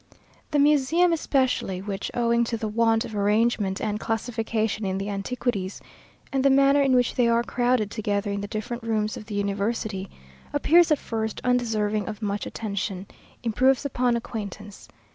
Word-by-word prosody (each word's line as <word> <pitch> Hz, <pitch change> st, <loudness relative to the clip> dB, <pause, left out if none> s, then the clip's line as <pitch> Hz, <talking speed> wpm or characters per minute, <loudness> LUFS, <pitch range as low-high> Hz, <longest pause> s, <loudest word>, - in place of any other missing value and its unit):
The 295 Hz, -, 0 dB
Museum 300 Hz, +4 st, +4 dB
especially, 260 Hz, -, 0 dB
which, 195 Hz, 0 st, -4 dB
owing 235 Hz, 0 st, +2 dB
to 230 Hz, 0 st, -2 dB
the 220 Hz, -, -3 dB
want 225 Hz, +1 st, +2 dB
of 220 Hz, -, -7 dB
arrangement 205 Hz, -1 st, +1 dB
and 210 Hz, -1 st, -2 dB
classification 225 Hz, -1 st, -2 dB
in 190 Hz, -1 st, -1 dB
the 195 Hz, +1 st, -3 dB
antiquities, 200 Hz, -1 st, -3 dB, 0.5 s
and 270 Hz, -1 st, +1 dB
the 275 Hz, -, +5 dB
manner 275 Hz, +1 st, +5 dB
in 270 Hz, -2 st, +3 dB
which 245 Hz, -1 st, +2 dB
they 245 Hz, -2 st, +2 dB
are 235 Hz, 0 st, +3 dB
crowded 245 Hz, -4 st, 0 dB
together 205 Hz, -1 st, -1 dB
in 200 Hz, 0 st, -2 dB
the 205 Hz, -, -4 dB
different 220 Hz, +3 st, -4 dB
rooms 215 Hz, -2 st, -1 dB
of 215 Hz, -, -9 dB
the 210 Hz, -, -5 dB
university, 200 Hz, 0 st, -2 dB, 0.4 s
appears 330 Hz, +4 st, +5 dB
at 305 Hz, -, +4 dB
first 220 Hz, -3 st, -3 dB
undeserving 220 Hz, -4 st, 0 dB
of 215 Hz, -1 st, -5 dB
much 205 Hz, -2 st, -2 dB
attention, 200 Hz, -3 st, -4 dB, 0.4 s
improves 255 Hz, +4 st, +2 dB
upon 250 Hz, -3 st, +1 dB
acquaintance. 210 Hz, -3 st, -6 dB
225 Hz, 160 wpm, -25 LUFS, 205-250 Hz, 0.5 s, the